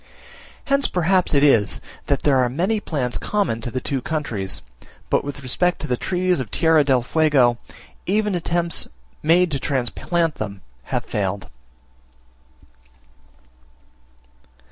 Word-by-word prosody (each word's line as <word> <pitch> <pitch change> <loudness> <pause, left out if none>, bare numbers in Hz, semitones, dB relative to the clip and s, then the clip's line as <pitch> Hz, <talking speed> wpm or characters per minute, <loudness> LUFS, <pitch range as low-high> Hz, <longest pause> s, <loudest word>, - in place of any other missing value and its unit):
Hence 275 0 +2
perhaps 180 -1 +2
it 140 - +4
is, 115 -9 +4 0.3
that - - 0
there 140 -3 +4
are 125 -1 +2
many 185 - 0
plants 135 - -2
in - - -10
common 200 - 0
to 120 - -3
the 130 - -3
two 135 +1 -2
countries 100 - -3 0.5
but - - +3
with 140 0 -6
respect 180 +8 +1
to 155 - -4
the 125 - +1
trees 180 +4 0
of 125 -5 -4
Tierra 160 +5 +4
del 130 -3 +2
Fuego, 130 -5 +3 0.5
even 210 +2 +1
attempts 170 -1 0 0.3
made 170 +3 +4
to 140 - -1
transplant 150 +6 -1
them 100 -2 -5 0.2
have - - -2
failed. 95 -2 -3
145 Hz, 135 wpm, -22 LUFS, 120-175 Hz, 0.5 s, it